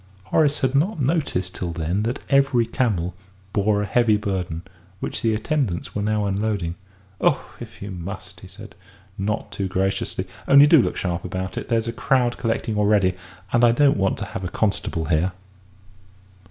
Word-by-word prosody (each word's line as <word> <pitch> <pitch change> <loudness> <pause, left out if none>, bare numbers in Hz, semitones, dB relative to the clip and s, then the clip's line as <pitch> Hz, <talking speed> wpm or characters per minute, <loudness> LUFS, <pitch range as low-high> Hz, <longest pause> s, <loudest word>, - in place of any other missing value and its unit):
Horace 145 +9 +2
had 130 0 +1
not 165 +7 +1
noticed 135 - 0
till 90 -2 -3
then 85 +5 -1
that 115 +3 -1
every 135 -4 +3
camel 105 -8 0 0.4
bore 105 0 +2
a - - -1
heavy 110 +1 +3
burden, 95 -5 -3 0.4
which - - -4
the 110 -1 +2
attendants 115 - -1
were 105 - -2
now 105 0 0
unloading. 100 -3 -1 0.5
"Oh, - - +2
if - - -10
you 100 - -6
must!" 95 +1 -7
he 95 - -12
said, 105 +3 -12 0.4
not 105 +2 -2
too 100 - -2
graciously; 95 0 -1 0.2
"only 140 +1 +8
do 150 -1 +7
look - - -2
sharp 85 -1 -2
about 95 +1 -4
it - - -5
there's 115 -1 +1
a 115 - -2
crowd 125 0 +1
collecting 115 -2 -1
already, 100 -3 +3 0.4
and 120 0 +4
I 120 -1 +6
don't 140 +2 +4
want 95 -1 +1
to 105 - -4
have 95 - -6
a 90 - -2
constable 95 -5 -1
here." 85 +3 +1
105 Hz, 175 wpm, -23 LUFS, 95-120 Hz, 0.5 s, only